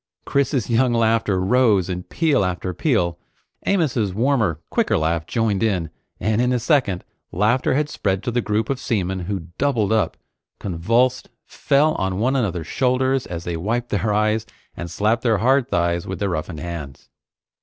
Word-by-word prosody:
Chris's 140 Hz, -3 st, 0 dB
young 120 Hz, +1 st, +2 dB
laughter 115 Hz, -4 st, +2 dB
rose 100 Hz, -2 st, +3 dB
in 90 Hz, -1 st, -3 dB
peal 150 Hz, -, +1 dB
after 90 Hz, 0 st, -2 dB
peal. 90 Hz, -, 0 dB, 0.5 s
Amos's 130 Hz, -, +1 dB
warmer, 115 Hz, -, +1 dB
quicker -, -, +2 dB
laugh 80 Hz, 0 st, -1 dB
joined 110 Hz, -4 st, 0 dB
in, 90 Hz, -8 st, 0 dB, 0.3 s
and 110 Hz, +1 st, +1 dB
in 125 Hz, 0 st, +2 dB
a 125 Hz, -, +2 dB
second, 120 Hz, -, +1 dB, 0.3 s
laughter 110 Hz, +8 st, +2 dB
had 150 Hz, +1 st, +1 dB
spread 95 Hz, -9 st, -2 dB
to 120 Hz, -, -2 dB
the 120 Hz, +1 st, +1 dB
group 110 Hz, +2 st, -1 dB
of 135 Hz, -, -2 dB
seamen 95 Hz, -7 st, -1 dB
who 90 Hz, -2 st, -4 dB
doubled 120 Hz, -7 st, +1 dB
up, 105 Hz, -7 st, +1 dB, 0.4 s
convulsed, 115 Hz, +8 st, +1 dB, 0.2 s
fell 150 Hz, +2 st, +2 dB
on 95 Hz, -1 st, -1 dB
one 125 Hz, +6 st, +1 dB
another's 95 Hz, -, -1 dB
shoulders 130 Hz, -, +1 dB
as 85 Hz, -1 st, -5 dB
they 85 Hz, -1 st, -3 dB
wiped 115 Hz, +8 st, -2 dB
their 105 Hz, +1 st, 0 dB
eyes, 110 Hz, +1 st, +1 dB, 0.3 s
and 85 Hz, -, -6 dB
slapped 110 Hz, +6 st, +1 dB
their 115 Hz, -3 st, +2 dB
hard 130 Hz, +4 st, +2 dB
thighs 85 Hz, -3 st, 0 dB
with 95 Hz, -, -4 dB
their 100 Hz, -1 st, -1 dB
roughened 80 Hz, -1 st, -4 dB
hands. 80 Hz, -6 st, -7 dB
110 Hz, 165 wpm, -22 LUFS, 90-125 Hz, 0.5 s, rose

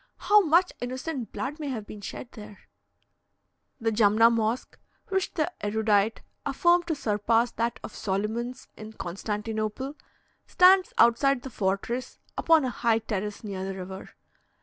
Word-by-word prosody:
How 420 Hz, 0 st, +5 dB
much 350 Hz, +1 st, +3 dB
innocent 255 Hz, +1 st, -4 dB
blood 290 Hz, +4 st, -4 dB
may 300 Hz, -, -4 dB
have 230 Hz, -6 st, -4 dB
been 210 Hz, 0 st, -10 dB
shed 235 Hz, -, -7 dB
there! 210 Hz, -2 st, -12 dB, 1.2 s
The 225 Hz, 0 st, 0 dB
Jumna 220 Hz, +1 st, +5 dB
Mosque, 230 Hz, +1 st, -1 dB, 0.3 s
which 385 Hz, -1 st, 0 dB
the 330 Hz, +1 st, 0 dB
erudite 215 Hz, 0 st, +1 dB, 0.2 s
affirm 345 Hz, +5 st, +3 dB
to 325 Hz, -, 0 dB
surpass 230 Hz, -1 st, +1 dB
that 230 Hz, 0 st, -2 dB
of -, -, -8 dB
Soliman's 220 Hz, +6 st, -3 dB
in 215 Hz, 0 st, -10 dB
Constantinople, 215 Hz, +7 st, -4 dB, 0.5 s
stands 370 Hz, +1 st, +5 dB
outside 245 Hz, +3 st, +4 dB
the 265 Hz, -, -7 dB
fortress, 210 Hz, +5 st, -2 dB, 0.2 s
upon 325 Hz, -4 st, +4 dB
a 255 Hz, -, -1 dB
high 230 Hz, -2 st, +2 dB
terrace 210 Hz, -1 st, -4 dB
near 195 Hz, -3 st, -5 dB
the 195 Hz, 0 st, -4 dB
river. 190 Hz, +1 st, -8 dB
230 Hz, 140 wpm, -27 LUFS, 210-270 Hz, 1.2 s, How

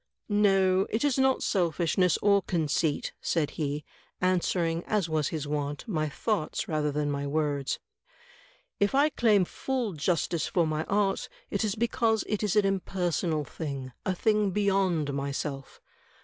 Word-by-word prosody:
"No, 195 Hz, -2 st, +3 dB
it 220 Hz, -, -1 dB
is 280 Hz, -3 st, +2 dB
not 265 Hz, 0 st, +3 dB
selfishness 175 Hz, -1 st, +2 dB
or 200 Hz, -1 st, +5 dB
conceit," 160 Hz, -4 st, 0 dB
said 150 Hz, -3 st, 0 dB
he, 145 Hz, -1 st, -3 dB, 0.3 s
answering, 175 Hz, -2 st, +1 dB
as 205 Hz, -5 st, 0 dB
was 155 Hz, -3 st, 0 dB
his 150 Hz, -3 st, -4 dB
wont, 145 Hz, +2 st, -3 dB
my 155 Hz, -7 st, -1 dB
thoughts 180 Hz, +1 st, -2 dB
rather 150 Hz, -2 st, 0 dB
than 145 Hz, 0 st, -1 dB
my 140 Hz, 0 st, -2 dB
words. 145 Hz, -2 st, -1 dB, 1.0 s
"If 200 Hz, +5 st, +2 dB
I 290 Hz, +3 st, +5 dB
claim 215 Hz, -9 st, +3 dB
full 250 Hz, 0 st, -2 dB
justice 165 Hz, +1 st, 0 dB
for 175 Hz, -2 st, +2 dB
my 155 Hz, 0 st, -1 dB
art, 200 Hz, -1 st, 0 dB, 0.2 s
it -, -, 0 dB
is 210 Hz, -2 st, 0 dB
because 225 Hz, -1 st, +1 dB
it 210 Hz, -, -1 dB
is 210 Hz, -2 st, 0 dB
an 210 Hz, -1 st, +4 dB
impersonal 180 Hz, -4 st, 0 dB
thing 140 Hz, -5 st, -5 dB
— -, -, -51 dB
a 185 Hz, -, -1 dB
thing 210 Hz, +1 st, +2 dB
beyond 190 Hz, -7 st, +1 dB
myself. 140 Hz, 0 st, -4 dB
175 Hz, 150 wpm, -28 LUFS, 150-205 Hz, 1.0 s, or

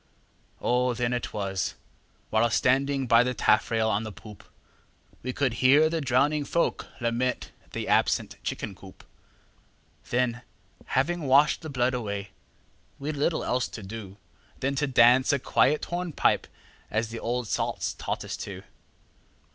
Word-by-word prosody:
O! 125 Hz, 0 st, +1 dB
then 120 Hz, 0 st, 0 dB
it 120 Hz, -, -3 dB
was 95 Hz, -2 st, -2 dB, 0.6 s
(while 115 Hz, +2 st, +3 dB
standing 135 Hz, +3 st, +2 dB
by 115 Hz, -1 st, +6 dB
the 125 Hz, +1 st, 0 dB
taffrail 110 Hz, +1 st, +2 dB
on 105 Hz, -1 st, +1 dB
the 110 Hz, -1 st, -6 dB
poop) 105 Hz, 0 st, -13 dB, 0.8 s
We 130 Hz, -, -3 dB
could 130 Hz, -2 st, 0 dB
hear 145 Hz, +5 st, +6 dB
the 165 Hz, -1 st, -1 dB
drowning 140 Hz, +3 st, +2 dB
folk 170 Hz, +4 st, -1 dB
lament 120 Hz, +1 st, -1 dB, 0.2 s
the -, -, -4 dB
absent -, -, +2 dB
chicken -, -, -4 dB
coop; -, -, -14 dB, 1.1 s
Then, 120 Hz, -1 st, 0 dB, 0.6 s
having 160 Hz, +3 st, +1 dB
washed 140 Hz, +3 st, +4 dB
the 160 Hz, -, -7 dB
blood 130 Hz, -2 st, +1 dB
away, 100 Hz, -4 st, -4 dB, 0.7 s
we'd 150 Hz, +2 st, -4 dB
little 150 Hz, +3 st, 0 dB
else 125 Hz, 0 st, 0 dB
to 110 Hz, -, -9 dB
do 100 Hz, -1 st, -8 dB, 0.4 s
Than 135 Hz, +1 st, 0 dB
to 145 Hz, +1 st, +1 dB
dance 125 Hz, 0 st, +5 dB
a 140 Hz, -, +3 dB
quiet 140 Hz, +2 st, +2 dB
hornpipe 175 Hz, -2 st, 0 dB, 0.4 s
as 110 Hz, +1 st, -1 dB
the 115 Hz, 0 st, -6 dB
old 120 Hz, 0 st, -2 dB
salts -, -, -1 dB
taught -, -, -4 dB
us -, -, -4 dB
to. -, -, -7 dB
125 Hz, 145 wpm, -27 LUFS, 115-140 Hz, 1.1 s, by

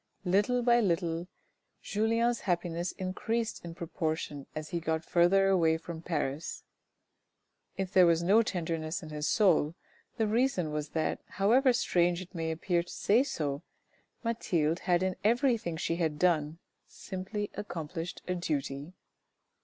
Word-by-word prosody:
Little 205 Hz, +7 st, +2 dB
by 240 Hz, 0 st, +5 dB
little 170 Hz, -4 st, 0 dB, 0.6 s
Julien's 230 Hz, +3 st, +1 dB
happiness 175 Hz, -1 st, -1 dB
increased 220 Hz, +5 st, -2 dB
in 170 Hz, -1 st, -7 dB
proportion 155 Hz, -4 st, -3 dB
as 155 Hz, 0 st, -5 dB
he 175 Hz, -, -2 dB
got 160 Hz, -1 st, -2 dB
further 185 Hz, +3 st, +4 dB
away 165 Hz, -4 st, +3 dB
from 165 Hz, 0 st, -8 dB
Paris. 160 Hz, -2 st, -3 dB, 1.1 s
If 190 Hz, 0 st, -3 dB
there 185 Hz, -2 st, +7 dB
was 170 Hz, 0 st, +3 dB
no 200 Hz, +6 st, +5 dB
tenderness 165 Hz, -3 st, -3 dB
in 155 Hz, -, -8 dB
his 150 Hz, 0 st, -3 dB
soul, 170 Hz, -7 st, +3 dB, 0.4 s
the 225 Hz, -, +2 dB
reason 215 Hz, -, +1 dB
was 150 Hz, -1 st, -3 dB
that, 160 Hz, -, 0 dB
however 245 Hz, +7 st, +3 dB
strange 175 Hz, -7 st, +2 dB
it 185 Hz, +1 st, -10 dB
may 165 Hz, -2 st, -2 dB
appear 170 Hz, +2 st, 0 dB
to 175 Hz, -, -12 dB
say 220 Hz, +5 st, +3 dB
so, 145 Hz, -, -2 dB, 0.6 s
Mathilde 175 Hz, -8 st, 0 dB
had 175 Hz, 0 st, +1 dB
in 185 Hz, -1 st, -1 dB
everything 230 Hz, -, +2 dB
she 165 Hz, +1 st, -1 dB
had 160 Hz, -3 st, 0 dB
done, 160 Hz, -2 st, +2 dB, 0.3 s
simply 200 Hz, +2 st, -5 dB
accomplished 165 Hz, -3 st, -5 dB
a 180 Hz, -, 0 dB
duty. 150 Hz, -2 st, -3 dB
175 Hz, 140 wpm, -30 LUFS, 160-200 Hz, 1.1 s, there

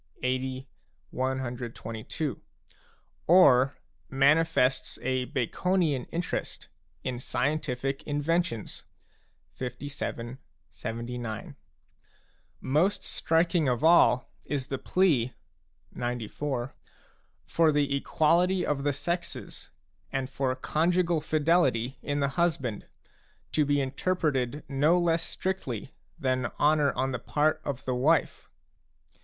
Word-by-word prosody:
LL, -, -, -1 dB
LVL, 130 Hz, +1 st, -1 dB, 0.5 s
LXXX., 130 Hz, -2 st, -2 dB
CXXIL); 115 Hz, +4 st, -4 dB, 0.9 s
or 140 Hz, -7 st, +6 dB, 0.3 s
manifests 140 Hz, -1 st, +3 dB
a 130 Hz, 0 st, 0 dB
Baconian 150 Hz, +2 st, 0 dB
interest 170 Hz, 0 st, -4 dB, 0.3 s
in 125 Hz, -1 st, -3 dB
scientific 135 Hz, -1 st, -1 dB
inventions 145 Hz, -, -1 dB, 0.8 s
(LVIL, 125 Hz, -1 st, -5 dB, 0.3 s
LXXIX.). 115 Hz, -1 st, -5 dB, 1.1 s
Most 165 Hz, +9 st, +1 dB
striking 165 Hz, -2 st, +1 dB
of 125 Hz, +3 st, -1 dB
all 160 Hz, -7 st, +5 dB, 0.2 s
is 140 Hz, -2 st, -2 dB
the 135 Hz, -, -2 dB
plea 150 Hz, -11 st, +2 dB, 0.6 s
(XCIV.) 120 Hz, +2 st, -3 dB, 0.7 s
for 165 Hz, -2 st, +3 dB
the 145 Hz, -1 st, +1 dB
equality 175 Hz, +6 st, +2 dB
of 140 Hz, -2 st, -1 dB
the 145 Hz, 0 st, +1 dB
sexes 170 Hz, +5 st, -4 dB, 0.4 s
and 135 Hz, -1 st, -1 dB
for 135 Hz, -1 st, 0 dB
conjugal 170 Hz, +4 st, +1 dB
fidelity 145 Hz, -6 st, +2 dB
in 145 Hz, 0 st, -1 dB
the 140 Hz, -, +3 dB
•husband, 140 Hz, -, -1 dB, 0.7 s
to 155 Hz, -, +3 dB
be 145 Hz, 0 st, +2 dB
interpreted 140 Hz, -1 st, -1 dB
no 145 Hz, +5 st, +3 dB
less 170 Hz, -1 st, +2 dB
strictly 150 Hz, -, -4 dB, 0.2 s
than 130 Hz, -5 st, 0 dB
honour 150 Hz, -1 st, +4 dB
on 135 Hz, +1 st, -1 dB
the 125 Hz, -, -3 dB
part 155 Hz, +1 st, +1 dB
of 135 Hz, -2 st, -4 dB
the 130 Hz, -, 0 dB
wife. 140 Hz, +4 st, +1 dB
140 Hz, 100 wpm, -28 LUFS, 130-160 Hz, 1.1 s, or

